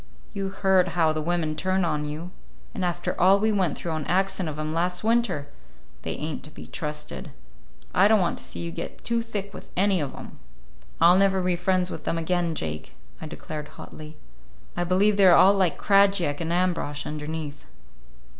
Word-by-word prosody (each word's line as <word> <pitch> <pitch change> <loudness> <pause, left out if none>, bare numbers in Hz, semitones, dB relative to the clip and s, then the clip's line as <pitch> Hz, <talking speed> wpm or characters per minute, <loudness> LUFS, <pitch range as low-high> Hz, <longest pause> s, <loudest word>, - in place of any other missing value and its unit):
You 195 -1 -3
heard 190 -1 +2
how 160 -2 +3
the 155 - -2
women 160 -1 -1
turned 185 +2 +1
on 150 -2 -1
you—and 150 - -8
after 175 -1 -1
all 190 +2 +6
we 220 +2 +1
went 185 -7 +1
through 170 - -4
on 155 -2 -3
account 190 -1 0
of 150 - -6
'em 155 0 -3
last 180 +3 0
winter! 220 -10 +1 0.6
They - - -3
ain't 155 0 -4
to - - -9
be - - -11
trusted. 150 -1 -6 0.6
I 190 +4 +5
don't 215 0 +5
want 175 -2 0
to - - -11
see - - -7
you 170 0 -4
get - - -7
too 235 0 0
thick 205 -3 -5
with - - -10
any 195 -2 +3
of 140 -2 -4
'em." - - -11 0.6
"I'll 180 +2 +6
never 190 -1 +3
be 180 -1 +1
friends 180 +1 0
with - - -7
them 165 - -1
again, 170 0 0
Jake," 75 - -5 0.3
I 160 - -5
declared 155 -1 -7
hotly. 155 0 -10 0.6
"I 175 - -1
believe 200 +4 +3
they 195 -2 +6
are 175 - +8
all 195 +2 +7
like 190 -4 +1
Krajiek 195 -7 +3
and 165 0 -2
Ambrosch 175 -5 0
underneath." 150 -1 -5
175 Hz, 190 wpm, -25 LUFS, 155-190 Hz, 0.6 s, are